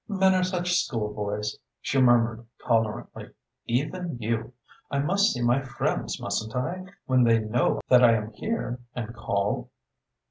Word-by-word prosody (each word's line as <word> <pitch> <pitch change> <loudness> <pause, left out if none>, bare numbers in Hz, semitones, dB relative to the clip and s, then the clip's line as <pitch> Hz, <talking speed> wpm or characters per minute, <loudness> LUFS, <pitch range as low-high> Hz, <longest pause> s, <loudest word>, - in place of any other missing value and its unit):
"Men 190 -3 +3
are 185 -1 +2
such 180 -1 0
schoolboys," 105 -2 -3 0.2
she 135 0 +1
murmured 120 -2 +3 0.2
tolerantly. 115 -2 -1 0.4
"Even 150 +5 -1
you! 115 +2 -2 0.4
I 140 - -1
must 195 +9 +3
see 120 - -2
my 120 +3 +3
friends, 135 -2 -2
mustn't 110 +2 -3
I, 175 +9 -2 0.2
when 130 -1 +4
they 115 -1 +5
know 110 +3 0
that 125 -1 +6
I 115 -1 +7
am 110 0 -3
here 125 - -3 0.2
and 115 -1 -4
call?" 100 0 -1
120 Hz, 145 wpm, -26 LUFS, 110-145 Hz, 0.4 s, I